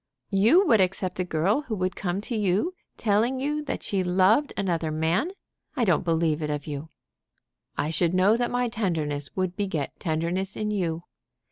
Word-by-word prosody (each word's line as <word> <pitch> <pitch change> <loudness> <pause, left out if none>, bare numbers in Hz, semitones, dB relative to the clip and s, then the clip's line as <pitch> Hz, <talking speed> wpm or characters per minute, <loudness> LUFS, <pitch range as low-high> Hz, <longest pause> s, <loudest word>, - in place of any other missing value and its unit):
"You 230 - +5
would 225 - +5
accept 185 0 -1
a - - +2
girl 180 - +1
who 220 - -2
would 185 -1 -1
come 185 +1 -2
to 230 +3 -3
you 210 - +1 0.2
telling 230 +5 +1
you 300 +3 -1
that - - -4
she 195 -2 0
loved 190 +10 +3
another 170 -5 0
man? 160 - 0 0.5
I 250 -5 +1
don't 175 -6 +2
believe 165 -2 +1
it 150 - -2
of 150 -1 -3
you." 150 +1 -6 0.9
"I 150 - 0
should 170 +2 +1
know 190 +4 +5
that 240 +1 0
my 245 0 0
tenderness 160 - -2
would 185 -1 -1
beget 190 -9 -3
tenderness 170 +4 -2
in 210 0 -2
you." 170 -5 -1
185 Hz, 175 wpm, -26 LUFS, 165-215 Hz, 0.9 s, You